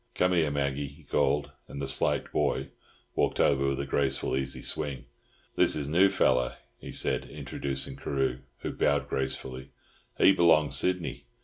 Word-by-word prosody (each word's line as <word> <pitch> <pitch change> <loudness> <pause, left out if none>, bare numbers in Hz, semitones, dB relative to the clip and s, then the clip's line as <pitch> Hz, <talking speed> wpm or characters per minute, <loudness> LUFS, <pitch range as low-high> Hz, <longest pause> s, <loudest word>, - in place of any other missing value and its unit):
Come 90 0 +2
here, 80 -4 +3
Maggie," 70 0 -1
he 70 +4 -15
called, 75 +1 +1 0.2
and 70 - -7
the 70 - -2
slight 65 - 0
"boy" - - 0 0.4
walked - - 0
over 70 -1 +3
with 70 0 0
a - - -3
graceful, 70 -1 0
easy 65 0 -3
swing. 70 -5 -3 0.5
"This - - +3
is 75 -2 -3
new 90 +6 +5
feller?" 65 -10 +2 0.2
he - - -8
said, - - -1
introducing 70 -1 -4
Carew, 65 -2 -1 0.2
who - - -3
bowed 70 0 +1
gracefully. 65 0 -4 0.5
"He 95 - +7
b'long 80 -4 +5
Sydney. 70 -2 -1
70 Hz, 155 wpm, -29 LUFS, 65-75 Hz, 0.5 s, He